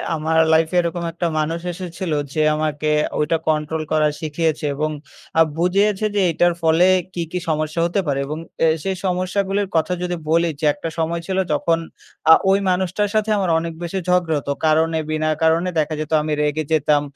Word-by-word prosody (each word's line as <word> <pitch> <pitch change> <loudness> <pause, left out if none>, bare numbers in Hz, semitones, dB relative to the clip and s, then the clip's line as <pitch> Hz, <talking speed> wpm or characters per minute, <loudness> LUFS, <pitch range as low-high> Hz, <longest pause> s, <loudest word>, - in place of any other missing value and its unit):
আমার 160 +1 0 0.2
লাইফে 160 +2 +2
এরকম 170 0 -3
একটা 170 +1 -2
মানুষ 160 +2 -1
এসেছিল 180 -1 -5 0.2
যে 155 - 0
আমাকে 155 -1 -1 0.3
ওইটা 150 +2 +1
কন্ট্রোল 155 +1 -1
করা 155 -1 +3
শিখিয়েছে 155 -1 -1
এবং 155 +2 -1 0.5
আ - - +8 0.2
বুঝিয়েছে 195 +4 +2
যে 200 - +3
এটার 175 +2 +2
ফলে 165 +2 +4 0.3
কী, 175 - -3
কী 180 - -2
সমস্যা 155 +1 -1
হতে 175 +4 0
পারে? 140 -1 0
এবং 150 +2 -4 0.3
এ - - +5 0.2
সেই 195 0 -1
সমস্যাগুলির 190 +2 0
কথা 165 +3 +1
যদি 180 0 -2
বলি, 170 +1 +3
যে 155 - -2
একটা 165 -2 -5
সময় 165 +1 -1
ছিল 190 -1 -2 0.2
যখন 165 +3 +1 0.5
আ - - +12 0.2
ওই 195 +1 +4
মানুষটার 185 +3 0
সাথে 215 0 +1
আমার 190 -3 0
অনেক 165 0 -5
বেশি 175 +3 -3
ঝগড়া 175 -4 +2
হত 140 - -9 0.2
কারণে 160 +1 +2
বিনা 155 0 0
কারণে। 165 +3 +3
দেখা 155 +1 0
যেত 155 - -6
আমি 155 0 -2
রেগে 150 +1 0
যেতাম 150 -1 +3
165 Hz, 180 wpm, -20 LUFS, 155-180 Hz, 0.5 s, আ